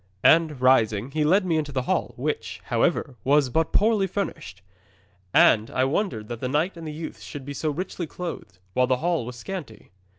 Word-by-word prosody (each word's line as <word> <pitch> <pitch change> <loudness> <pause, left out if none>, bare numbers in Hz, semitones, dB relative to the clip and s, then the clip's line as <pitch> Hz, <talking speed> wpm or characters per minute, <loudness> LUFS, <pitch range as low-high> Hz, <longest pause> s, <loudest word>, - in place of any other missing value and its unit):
And, 160 -4 +4
rising, 120 -2 +3
he 155 +1 0
led 185 +6 +3
me 165 -3 +1
into 150 -2 -2
the 130 -2 -1
hall, - - -1
which, - - -3
however, 130 -3 0
was 140 0 +3
but 160 +4 +1
poorly 210 -2 +3
furnished. 170 - -5 0.7
And 110 +4 +5
I 130 - 0
wondered 135 - -1
that 120 -1 -5
the 125 - -3
knight 155 +8 0
and 165 -1 -8
the - - -4
youths 160 +2 -7
should 145 -3 -8
be 145 - -5
so 155 +3 -2
richly 175 +2 -4
clothed, 165 - -7 0.2
while 125 0 +3
the 130 0 +2
hall 165 -4 -1
was 125 - -7
scanty. 125 - -8
145 Hz, 195 wpm, -25 LUFS, 125-170 Hz, 0.7 s, And